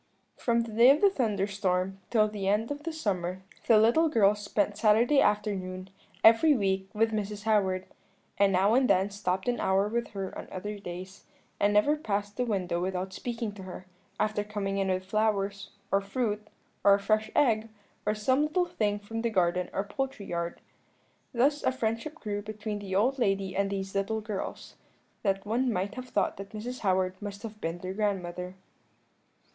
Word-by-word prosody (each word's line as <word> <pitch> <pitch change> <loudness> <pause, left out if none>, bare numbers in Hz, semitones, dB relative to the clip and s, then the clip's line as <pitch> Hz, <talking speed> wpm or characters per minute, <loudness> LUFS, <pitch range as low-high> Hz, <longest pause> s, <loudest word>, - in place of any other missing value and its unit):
"From 235 -1 +1
the 230 - -7
day 235 +3 +7
of 285 +2 +6
the 400 -1 +5
thunderstorm 195 - 0
till 215 -3 +4
the 205 -2 -4
end 210 +5 +1
of 290 0 -4
the 330 - -1
summer 190 - -2 0.2
the 225 - +7
little 240 +10 +4
girls 210 -5 +4
spent 205 0 0
Saturday 225 +6 +4
afternoon, 190 -3 -1 0.3
every 255 +7 +7
week, 190 -2 0
with 225 +1 +2
Mrs. 210 -1 -3
Howard, 190 -4 +1 0.5
and 200 -1 +5
now 195 +3 +3
and 255 +1 +3
then 195 +1 +3
stopped 190 -1 -2
an 245 -1 +1
hour 190 +1 +2
with 235 +2 -1
her 195 -2 -4
on - - -7
other 205 +2 -5
days; 185 +1 -8 0.3
and 205 0 +3
never 210 +9 +4
passed 205 -7 -3
the 250 - 0
window 180 -6 -1
without 185 +1 -2
speaking 230 0 -4
to 200 -1 -11
her, 185 0 -8 0.3
often 210 -1 0
coming 200 -2 -2
in 195 - +1
with 185 0 -1
flowers, 200 -1 0 0.2
or 195 - +3
fruit, 210 0 -2 0.4
or 200 0 +7
a - - -2
fresh 215 +2 +1
egg, 225 -6 +3 0.3
or 210 +1 0
some 260 +6 +2
little 330 +4 +1
thing 210 -11 -1
from 225 +2 -5
the 235 - 0
garden 180 -3 +1
or 195 - -1
poultry 260 0 -4
yard. 170 -1 -4 0.7
Thus 280 +5 +2
such 260 - +1
a - - -15
friendship 230 +6 -2
grew 210 -8 -4
up 205 - -10
between 215 0 -4
the 195 -2 -4
old 255 +7 +2
lady 195 -4 0
and 200 +1 +1
these 195 -1 -4
little 200 +3 0
girls, 210 -2 -6 0.4
that 195 -1 0
one 240 +4 +1
might 195 0 -2
have 255 +1 -7
thought 205 - 0
that 195 +2 -9
Mrs. 245 +4 -5
Howard 185 -1 0
must 205 0 -7
have 215 -1 -8
been 165 +1 -2
their 185 +1 -5
grandmother. 185 -3 -2
205 Hz, 185 wpm, -29 LUFS, 195-225 Hz, 0.7 s, day